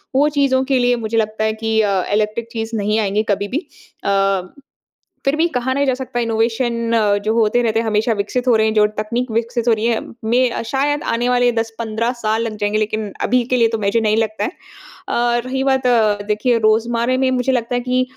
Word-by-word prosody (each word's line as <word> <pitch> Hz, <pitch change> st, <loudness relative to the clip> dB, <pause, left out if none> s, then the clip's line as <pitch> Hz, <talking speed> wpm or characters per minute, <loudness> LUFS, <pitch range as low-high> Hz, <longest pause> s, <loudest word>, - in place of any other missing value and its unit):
वो 290 Hz, +2 st, +4 dB
चीज़ों 260 Hz, -2 st, +3 dB
के 260 Hz, -, +3 dB
लिए 245 Hz, 0 st, +3 dB
मुझे 225 Hz, +1 st, -1 dB
लगता 215 Hz, 0 st, 0 dB
है 220 Hz, 0 st, +1 dB
कि 220 Hz, 0 st, 0 dB, 0.4 s
इलेक्ट्रिक 215 Hz, +2 st, -1 dB
चीज़ 225 Hz, 0 st, -4 dB
नहीं 210 Hz, +1 st, 0 dB
आएँगे 210 Hz, 0 st, 0 dB
कभी-भी 205 Hz, -, -3 dB, 0.4 s
अ, 195 Hz, -1 st, +2 dB, 0.8 s
फ़िर 275 Hz, +2 st, +2 dB
भी 330 Hz, -, +3 dB
कहा 260 Hz, -4 st, -2 dB
नहीं 280 Hz, +1 st, +1 dB
जा 265 Hz, -, +2 dB
सकता 255 Hz, -1 st, -4 dB
इनोवेशन 230 Hz, +1 st, 0 dB, 0.3 s
जो 220 Hz, -, +1 dB
होते 230 Hz, +1 st, +2 dB
रहते 225 Hz, -1 st, +1 dB
हैं 230 Hz, -, -2 dB
हमेशा 220 Hz, +2 st, +1 dB
विकसित 220 Hz, +5 st, -2 dB
हो 240 Hz, -, +5 dB
रहे 220 Hz, 0 st, +3 dB
हैं 220 Hz, -, 0 dB
जो 210 Hz, -1 st, +5 dB
तकनीक 235 Hz, +4 st, -2 dB
विकसित 235 Hz, +1 st, -2 dB
हो 235 Hz, -, +5 dB
रही 220 Hz, 0 st, -1 dB
है 230 Hz, -1 st, +1 dB, 0.3 s
मैं 250 Hz, -1 st, +2 dB
शायद 290 Hz, +2 st, 0 dB
आने 240 Hz, +2 st, 0 dB
वाले 245 Hz, 0 st, +3 dB
10-15 225 Hz, +1 st, -2 dB
साल 220 Hz, +1 st, 0 dB
लग 220 Hz, -2 st, -4 dB
जाएँगे 205 Hz, +1 st, +1 dB
लेकिन 215 Hz, -1 st, -2 dB, 0.2 s
अभी 250 Hz, -1 st, +2 dB
के -, -, +4 dB
लिए 230 Hz, -1 st, +4 dB
तो -, -, -1 dB
मुझे 205 Hz, +2 st, +1 dB
नहीं 215 Hz, 0 st, +1 dB
लगता 220 Hz, -1 st, -1 dB
है। -, -, -1 dB, 0.6 s
अ, 240 Hz, 0 st, +1 dB
रही 265 Hz, +1 st, -2 dB
बात 265 Hz, -2 st, +1 dB, 0.4 s
देखिए 230 Hz, +3 st, +1 dB
रोज़मर्रा 235 Hz, +3 st, +1 dB
में 260 Hz, 0 st, +2 dB
मुझे 255 Hz, +1 st, +1 dB
लगता 245 Hz, -1 st, -1 dB
है 245 Hz, -, 0 dB
कि 255 Hz, +1 st, +1 dB
230 Hz, 210 wpm, -18 LUFS, 220-250 Hz, 0.8 s, हो